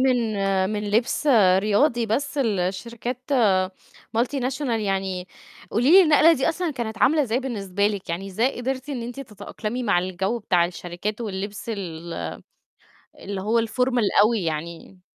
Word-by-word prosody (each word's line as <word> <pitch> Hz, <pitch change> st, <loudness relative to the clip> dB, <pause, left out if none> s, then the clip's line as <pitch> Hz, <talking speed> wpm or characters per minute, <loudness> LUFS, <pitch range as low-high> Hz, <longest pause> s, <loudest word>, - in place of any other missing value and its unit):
من 255 Hz, -1 st, +3 dB, 0.5 s
من 210 Hz, -1 st, -3 dB
لِبس 235 Hz, +7 st, +1 dB, 0.3 s
رياضي 225 Hz, +4 st, +2 dB
بس 280 Hz, +6 st, -1 dB
لشركات 230 Hz, +3 st, -2 dB, 1.0 s
multinational 260 Hz, +2 st, -1 dB
يعني. 195 Hz, -4 st, -2 dB, 0.4 s
قولي 245 Hz, +6 st, +2 dB
لي 380 Hz, +2 st, +9 dB
النقلة 315 Hz, +1 st, +6 dB
دي 280 Hz, 0 st, +1 dB
أصلًا 335 Hz, 0 st, -1 dB
كانت 225 Hz, -5 st, -5 dB
عاملة 300 Hz, +2 st, +4 dB
إزاي 245 Hz, -1 st, 0 dB
بالنسبة 200 Hz, -6 st, -1 dB
لِك؟ 205 Hz, -2 st, -3 dB
يعني 185 Hz, +4 st, -3 dB
إزاي 225 Hz, +8 st, 0 dB
قدرتِ 260 Hz, +2 st, -3 dB
إن 255 Hz, -5 st, -3 dB
أنتِ 245 Hz, +3 st, -6 dB
تتأقلمي 225 Hz, 0 st, -6 dB
مع 200 Hz, -6 st, +2 dB
الجو 185 Hz, +5 st, -2 dB
بتاع 180 Hz, -5 st, +2 dB
الشركات 180 Hz, +5 st, -5 dB
واللبس 200 Hz, 0 st, -5 dB
ال 170 Hz, -5 st, -5 dB, 1.1 s
اللي 195 Hz, -1 st, -5 dB
هو 225 Hz, +4 st, +2 dB
الformal 245 Hz, -2 st, +1 dB
أوي 215 Hz, -3 st, +2 dB
يعني؟ 165 Hz, +3 st, -5 dB
220 Hz, 140 wpm, -24 LUFS, 195-255 Hz, 1.1 s, لي